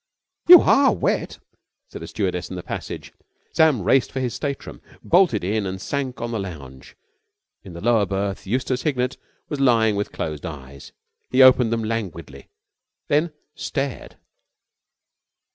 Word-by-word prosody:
"You 355 Hz, -2 st, +11 dB
are 275 Hz, -1 st, +4 dB
wet," -, -, -2 dB, 0.5 s
said -, -, -9 dB
a -, -, -7 dB
stewardess -, -, -3 dB
in -, -, -6 dB
the -, -, -6 dB
passage. -, -, -7 dB, 0.4 s
Sam 155 Hz, -, +3 dB
raced 135 Hz, +7 st, +2 dB
for 135 Hz, -, -4 dB
his 125 Hz, -3 st, -2 dB
state 140 Hz, -2 st, -4 dB
room. -, -, -11 dB
He -, -, -20 dB
bolted 170 Hz, -, +3 dB
in 100 Hz, +2 st, -1 dB
and 95 Hz, 0 st, -5 dB
sank 130 Hz, +4 st, -4 dB
on 120 Hz, 0 st, -3 dB
the 115 Hz, -, -2 dB
lounge. 70 Hz, -9 st, -9 dB, 0.7 s
In 95 Hz, -, -11 dB
the 85 Hz, -, -9 dB
lower 115 Hz, -3 st, +2 dB
berth 100 Hz, 0 st, -3 dB
Eustace 125 Hz, +3 st, -1 dB
Hignett 130 Hz, -4 st, -1 dB, 0.3 s
was 145 Hz, -, -5 dB
lying 115 Hz, -5 st, +3 dB
with 100 Hz, 0 st, -3 dB
closed 75 Hz, -2 st, -5 dB
eyes. 70 Hz, -3 st, -9 dB, 0.4 s
He 130 Hz, +1 st, +5 dB
opened 130 Hz, -3 st, +6 dB
them 115 Hz, -1 st, -1 dB
languidly 85 Hz, -11 st, -5 dB, 0.6 s
then 155 Hz, +3 st, +2 dB, 0.2 s
stared. 140 Hz, -4 st, -5 dB
115 Hz, 155 wpm, -22 LUFS, 95-135 Hz, 0.7 s, You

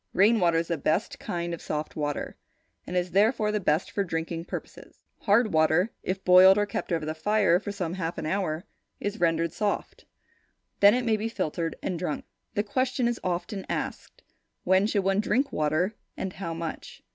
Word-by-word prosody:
Rain 215 Hz, +4 st, +5 dB
water 170 Hz, -3 st, +3 dB
is 165 Hz, 0 st, -1 dB
the 165 Hz, -3 st, -1 dB
best 165 Hz, +9 st, 0 dB
kind 170 Hz, -1 st, -3 dB
of 170 Hz, -, -6 dB
soft 150 Hz, 0 st, -4 dB
water, 145 Hz, -1 st, -3 dB, 0.5 s
and 180 Hz, -, -2 dB
is 180 Hz, 0 st, -1 dB
therefore, 210 Hz, +3 st, +3 dB
the 210 Hz, -, 0 dB
best 160 Hz, -3 st, 0 dB
for 200 Hz, -, 0 dB
drinking 165 Hz, -1 st, -3 dB
purposes. -, -, -9 dB, 0.2 s
Hard 215 Hz, 0 st, +3 dB
water, 160 Hz, +6 st, +3 dB
if 190 Hz, +1 st, -4 dB
boiled 185 Hz, +2 st, +8 dB
and 205 Hz, 0 st, +1 dB
kept 200 Hz, -, -4 dB
over 165 Hz, -2 st, 0 dB
the 155 Hz, -, -2 dB
fire 185 Hz, +1 st, +2 dB
for 205 Hz, 0 st, -5 dB
some 180 Hz, -5 st, -3 dB
half 170 Hz, -3 st, -3 dB
an -, -, -4 dB
hour, 175 Hz, -1 st, -1 dB, 0.3 s
is 205 Hz, +2 st, -3 dB
rendered 165 Hz, -1 st, +1 dB
soft. 205 Hz, -1 st, -3 dB, 0.7 s
Then 205 Hz, +3 st, +7 dB
it 250 Hz, -1 st, -1 dB
may 220 Hz, -2 st, +2 dB
be 220 Hz, +2 st, -2 dB
filtered 165 Hz, -5 st, -2 dB
and 175 Hz, -3 st, -2 dB
drunk. 170 Hz, -4 st, -3 dB, 0.3 s
The 205 Hz, -, +1 dB
question 255 Hz, +3 st, 0 dB
is 240 Hz, -1 st, -1 dB
often 185 Hz, +3 st, -3 dB
asked, -, -, -5 dB, 0.4 s
"When 190 Hz, +3 st, +3 dB
should 205 Hz, -3 st, 0 dB
one 195 Hz, +1 st, +2 dB
drink 270 Hz, +6 st, +1 dB
water, 155 Hz, +7 st, 0 dB, 0.2 s
and 190 Hz, -1 st, -4 dB
how 170 Hz, -4 st, -5 dB
much?" 165 Hz, -1 st, -6 dB
185 Hz, 190 wpm, -27 LUFS, 165-210 Hz, 0.7 s, boiled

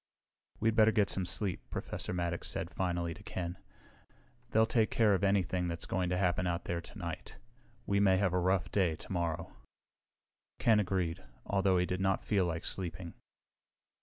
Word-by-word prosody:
"We'd 115 Hz, 0 st, +2 dB
better 110 Hz, -1 st, +6 dB
get 105 Hz, -2 st, +2 dB
some 95 Hz, -2 st, 0 dB
sleep," 95 Hz, +1 st, +1 dB
Professor -, -, -4 dB
Maddox 85 Hz, -1 st, -2 dB
said -, -, -4 dB
finally 85 Hz, -2 st, -1 dB
to 90 Hz, -, -14 dB
Ken. 90 Hz, -3 st, -5 dB, 0.9 s
"They'll 110 Hz, -1 st, +4 dB
take 110 Hz, -1 st, +2 dB
care 110 Hz, -3 st, +3 dB
of 95 Hz, -, 0 dB
anything 95 Hz, -2 st, +1 dB
that's 85 Hz, -1 st, -4 dB
going 90 Hz, -2 st, -1 dB
to 90 Hz, -, 0 dB
happen 90 Hz, -1 st, +1 dB
out 85 Hz, 0 st, -1 dB
there 85 Hz, -1 st, -2 dB
tonight. -, -, -7 dB, 0.5 s
We 100 Hz, 0 st, +1 dB
may 95 Hz, -2 st, +5 dB
have 95 Hz, -2 st, +1 dB
a 90 Hz, -, +2 dB
rough 95 Hz, +1 st, +1 dB
day 90 Hz, -6 st, +2 dB
tomorrow." 85 Hz, -1 st, -3 dB, 1.0 s
Ken 110 Hz, -2 st, +4 dB
agreed, 90 Hz, -3 st, -1 dB, 0.2 s
although 95 Hz, -2 st, +2 dB
he 90 Hz, -, +2 dB
did 90 Hz, +1 st, -2 dB
not 95 Hz, 0 st, +1 dB
feel 100 Hz, -4 st, +2 dB
like 85 Hz, -1 st, -3 dB
sleeping. 85 Hz, -2 st, -3 dB
90 Hz, 165 wpm, -32 LUFS, 85-100 Hz, 1.0 s, better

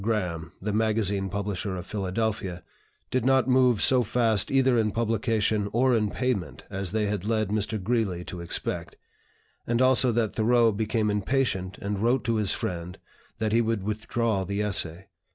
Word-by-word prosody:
Graham, 90 Hz, -7 st, -2 dB
the 105 Hz, +2 st, -3 dB
magazine 105 Hz, -3 st, +1 dB
publisher 100 Hz, 0 st, -3 dB
of 90 Hz, -, -6 dB
Philadelphia), 100 Hz, -3 st, -2 dB, 0.5 s
did 130 Hz, -2 st, +1 dB
not 130 Hz, 0 st, +3 dB
move 125 Hz, -4 st, +4 dB
so 130 Hz, -1 st, +5 dB
fast 115 Hz, -3 st, +1 dB
either 130 Hz, -2 st, +3 dB
in 110 Hz, -2 st, +2 dB
publication 110 Hz, -1 st, 0 dB
or 125 Hz, +2 st, +3 dB
in 105 Hz, -2 st, +1 dB
payment 100 Hz, -, -2 dB
as 95 Hz, -2 st, -3 dB
they 110 Hz, 0 st, 0 dB
had 100 Hz, -2 st, -2 dB
led 110 Hz, -1 st, 0 dB
Mr. 110 Hz, +1 st, -1 dB
Greeley 100 Hz, -4 st, -1 dB
to 90 Hz, -1 st, -7 dB
expect; 85 Hz, -, -3 dB, 0.7 s
and 120 Hz, 0 st, +1 dB
also 130 Hz, -1 st, +4 dB
that 110 Hz, -2 st, 0 dB
Thoreau 115 Hz, +1 st, +3 dB
became 110 Hz, 0 st, 0 dB
impatient 105 Hz, -3 st, -1 dB
and 100 Hz, 0 st, -3 dB
wrote 120 Hz, +3 st, +2 dB
to 115 Hz, -1 st, 0 dB
his 105 Hz, -3 st, +1 dB
friend 90 Hz, +1 st, -3 dB, 0.4 s
that 110 Hz, -1 st, -1 dB
he 115 Hz, +2 st, +4 dB
would 115 Hz, -3 st, -1 dB
withdraw 110 Hz, 0 st, -1 dB
the 100 Hz, +2 st, -3 dB
essay. 95 Hz, -3 st, -1 dB
110 Hz, 165 wpm, -26 LUFS, 100-115 Hz, 0.7 s, so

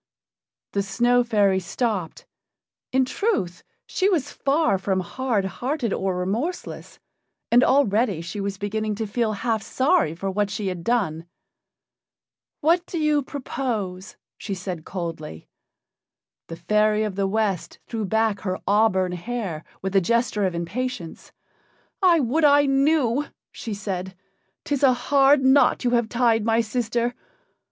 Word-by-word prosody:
The 200 Hz, -, 0 dB
Snow 240 Hz, +6 st, +2 dB
fairy 205 Hz, -5 st, +2 dB
stopped; 190 Hz, -2 st, -3 dB, 0.7 s
in 260 Hz, 0 st, +3 dB
truth, 250 Hz, -, -1 dB, 0.2 s
she 385 Hz, +1 st, +1 dB
was 305 Hz, -7 st, 0 dB
far 275 Hz, -, +1 dB
from 190 Hz, 0 st, 0 dB
hard 225 Hz, +1 st, -1 dB
hearted 245 Hz, -, -2 dB
or 190 Hz, -1 st, -1 dB
remorseless, 225 Hz, -, -4 dB, 0.5 s
and 245 Hz, +2 st, +6 dB
already 230 Hz, -, +2 dB
she 170 Hz, +5 st, -5 dB
was 195 Hz, 0 st, -3 dB
beginning 215 Hz, +1 st, -2 dB
to 220 Hz, +2 st, -3 dB
feel 215 Hz, +1 st, -1 dB
half 220 Hz, +1 st, -1 dB
sorry 260 Hz, -, +1 dB
for 195 Hz, +3 st, -3 dB
what 205 Hz, +1 st, 0 dB
she 205 Hz, -1 st, -3 dB
had 180 Hz, -2 st, -5 dB
done. 175 Hz, -8 st, 0 dB, 1.3 s
"What 335 Hz, +4 st, +4 dB
would 340 Hz, -, -2 dB
you 305 Hz, -1 st, +2 dB
propose?" 225 Hz, -9 st, -4 dB, 0.2 s
she 200 Hz, -, -4 dB
said 180 Hz, -3 st, -6 dB
coldly. 165 Hz, -, -6 dB, 1.0 s
The 165 Hz, -, -7 dB
fairy 210 Hz, +3 st, +2 dB
of 210 Hz, -2 st, -2 dB
the 195 Hz, 0 st, 0 dB
West 200 Hz, -3 st, -1 dB
threw 225 Hz, -2 st, -4 dB
back 220 Hz, +1 st, +1 dB
her 185 Hz, -2 st, -3 dB
auburn 195 Hz, -3 st, +2 dB
hair 180 Hz, -3 st, -4 dB, 0.2 s
with 190 Hz, 0 st, -3 dB
a 195 Hz, -, +6 dB
gesture 235 Hz, 0 st, +1 dB
of 180 Hz, -, -4 dB
impatience. 175 Hz, +1 st, -5 dB, 0.7 s
"I 350 Hz, -3 st, +5 dB
would 275 Hz, +6 st, 0 dB
I 290 Hz, 0 st, +6 dB
knew!" 275 Hz, -1 st, +2 dB, 0.2 s
she 220 Hz, -3 st, -6 dB
said. 190 Hz, -2 st, -5 dB, 0.5 s
"'Tis 285 Hz, -2 st, -2 dB
a 265 Hz, -3 st, +6 dB
hard 270 Hz, +2 st, +3 dB
knot 265 Hz, +1 st, +4 dB
you 245 Hz, -, +1 dB
have 235 Hz, -2 st, +1 dB
tied, 235 Hz, -2 st, +2 dB
my 225 Hz, +1 st, +2 dB
sister. 235 Hz, +1 st, -1 dB
220 Hz, 140 wpm, -24 LUFS, 190-255 Hz, 1.3 s, and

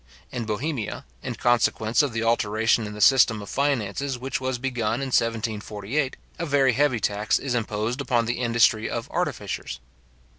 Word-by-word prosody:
In 120 Hz, -, -3 dB
Bohemia, 110 Hz, +2 st, -3 dB, 0.2 s
in -, -, -4 dB
consequence 120 Hz, 0 st, +2 dB
of 145 Hz, -3 st, 0 dB
the 115 Hz, 0 st, -2 dB
alteration 115 Hz, 0 st, +2 dB
in 105 Hz, -, -7 dB
the 105 Hz, -, -6 dB
system 125 Hz, -4 st, +5 dB
of 100 Hz, -, -8 dB
finances 135 Hz, -1 st, -1 dB
which 130 Hz, +1 st, -3 dB
was 130 Hz, -1 st, -1 dB
begun 120 Hz, -4 st, -1 dB
in 135 Hz, +2 st, -3 dB
1748, 115 Hz, +3 st, -1 dB, 0.2 s
a 170 Hz, -, -1 dB
very 135 Hz, -3 st, +3 dB
heavy 135 Hz, -1 st, +2 dB
tax 105 Hz, 0 st, +1 dB
is 135 Hz, -2 st, -3 dB
imposed 115 Hz, +2 st, -1 dB
upon 120 Hz, -4 st, +1 dB
the 120 Hz, +2 st, -2 dB
industry 115 Hz, -2 st, +3 dB
of 115 Hz, -1 st, -4 dB
artificers. -, -, -3 dB
115 Hz, 160 wpm, -25 LUFS, 110-130 Hz, 0.2 s, system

